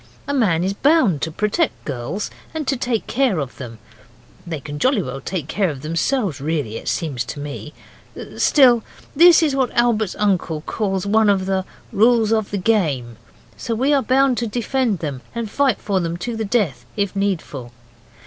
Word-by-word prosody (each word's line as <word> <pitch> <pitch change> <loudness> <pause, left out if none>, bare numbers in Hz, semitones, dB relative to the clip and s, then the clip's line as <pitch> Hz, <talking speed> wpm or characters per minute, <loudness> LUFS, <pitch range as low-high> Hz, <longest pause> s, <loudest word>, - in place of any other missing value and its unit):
A 285 - -1
man 190 -11 +2
is 190 +2 0
bound 265 - +3
to 160 - -2
protect 210 - -1
girls 140 - -4 0.2
and 305 -3 -3
take 250 -4 -1
care 250 -6 +1
of 140 -4 -4
them 120 -4 -8 0.7
they 160 -3 -3
can 145 +2 -7
jolly 255 - +2
well 135 0 -6
take 165 -2 -4
care 195 +1 0
of 135 -3 -7
themselves 170 - -1
really 145 -7 -2
it - - -9
seems 140 -7 -1
to 145 - -7
me 145 +1 -6 0.6
still, 245 -6 +5 0.3
this 340 +2 +7
is 290 -4 +1
what 265 -2 +1
Albert's 225 -5 +2
uncle 185 -6 0
calls 195 +1 -2
one 215 +1 +3
of 195 -2 +2
the 190 -1 -1 0.3
'rules 225 0 +3
of 220 -2 +1
the 205 - -2
game', 155 - 0 0.4
so 230 - -3
we 265 +6 +2
are 280 - +3
bound 265 -1 +2
to 235 - -1
defend 240 0 0
them 140 -5 -4
and 230 -3 -4
fight 275 -5 +2
for 200 -2 -1
them 170 -1 -2
to 230 +7 -4
the 220 0 -2
death, 190 - 0
if 200 -1 -1
needful. 165 -11 -2
200 Hz, 180 wpm, -20 LUFS, 155-240 Hz, 0.7 s, this